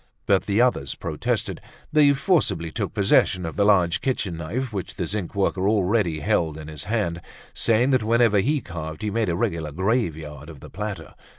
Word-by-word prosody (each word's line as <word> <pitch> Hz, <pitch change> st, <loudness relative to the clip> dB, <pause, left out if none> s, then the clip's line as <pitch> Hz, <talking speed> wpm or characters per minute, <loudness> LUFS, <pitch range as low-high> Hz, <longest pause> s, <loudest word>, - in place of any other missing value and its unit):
But 95 Hz, -2 st, +2 dB
the 100 Hz, +1 st, +1 dB
others 120 Hz, -, +1 dB
protested; -, -, -2 dB, 0.3 s
they 150 Hz, -2 st, +6 dB
forcibly 135 Hz, -, +1 dB
took -, -, -3 dB
possession 90 Hz, -1 st, +3 dB
of 80 Hz, -, -5 dB
the 100 Hz, -, +2 dB
large 90 Hz, -5 st, +3 dB
kitchen 110 Hz, -9 st, -1 dB
knife 110 Hz, +10 st, -4 dB
which 95 Hz, -4 st, -5 dB
the -, -, -2 dB
zinc 100 Hz, -3 st, -4 dB
worker 95 Hz, 0 st, +1 dB
already 100 Hz, -6 st, +1 dB
held 80 Hz, +1 st, 0 dB
in 80 Hz, 0 st, -8 dB
his 75 Hz, -2 st, -7 dB
hand, 85 Hz, -7 st, -1 dB, 0.3 s
saying 115 Hz, +4 st, +2 dB
that 130 Hz, -3 st, +3 dB
whenever 115 Hz, -1 st, +3 dB
he 145 Hz, +8 st, +1 dB
carved 80 Hz, -3 st, -7 dB
he 105 Hz, -, -1 dB
made 110 Hz, -2 st, 0 dB
a 85 Hz, -, 0 dB
regular 85 Hz, -7 st, -2 dB
graveyard 80 Hz, -, -2 dB
of 80 Hz, -4 st, -11 dB
the -, -, -12 dB
platter. -, -, -6 dB
95 Hz, 185 wpm, -24 LUFS, 80-115 Hz, 0.3 s, they